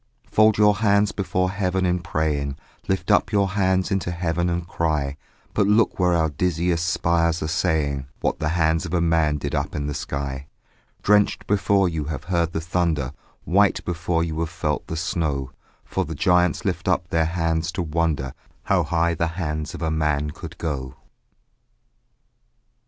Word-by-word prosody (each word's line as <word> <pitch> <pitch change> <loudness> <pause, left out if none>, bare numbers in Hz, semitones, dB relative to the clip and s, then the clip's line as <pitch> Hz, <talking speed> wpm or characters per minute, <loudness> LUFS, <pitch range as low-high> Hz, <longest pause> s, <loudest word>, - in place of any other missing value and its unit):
Fold 110 0 +5
your 105 -1 +5
hands 105 -1 +3
before 90 -1 -1
heaven 95 -1 0
in 90 0 +1
praying, 75 -4 -1 0.3
Lift 95 -1 0
up - - +3
your 100 -2 +2
hands 95 -2 +1
into 95 -2 0
heaven 85 0 -1
and 85 0 -2
cry; 75 -5 -1 0.4
But 105 -2 +2
look 105 0 +3
where 90 -1 +3
our 80 -2 +2
dizziest 85 +2 0
spires 85 -1 +1
are - - -1
saying 75 -5 0
What - - -1
the 75 - 0
hands 80 +2 +2
of 85 - -2
a - - +3
man 80 -3 +2
did - - -4
up - - -2
in 70 - -2
the 75 - -2
sky: 70 -1 -4 0.6
Drenched 105 0 +3
before 100 -1 +2
you 80 -4 -2
have 75 -3 -4
heard 85 -1 0
the 80 - -2
thunder, 80 -5 -1 0.3
White 100 +3 +2
before 85 -1 0
you 80 -1 -3
have 85 -1 -1
felt 80 -3 -2
the 80 - -4
snow; 80 -6 -1 0.3
For - - -1
the 80 - -6
giants 90 0 +2
lift - - -2
up 85 - +1
their 80 -1 +2
hands 80 0 0
to 90 - -1
wonder 75 -5 -1 0.3
How - - +2
high 85 0 +1
the 85 0 0
hands 75 -3 -3
of - - -6
a 80 - 0
man 75 -2 0
could - - -9
go. 65 -5 -4
85 Hz, 175 wpm, -23 LUFS, 75-90 Hz, 0.6 s, Fold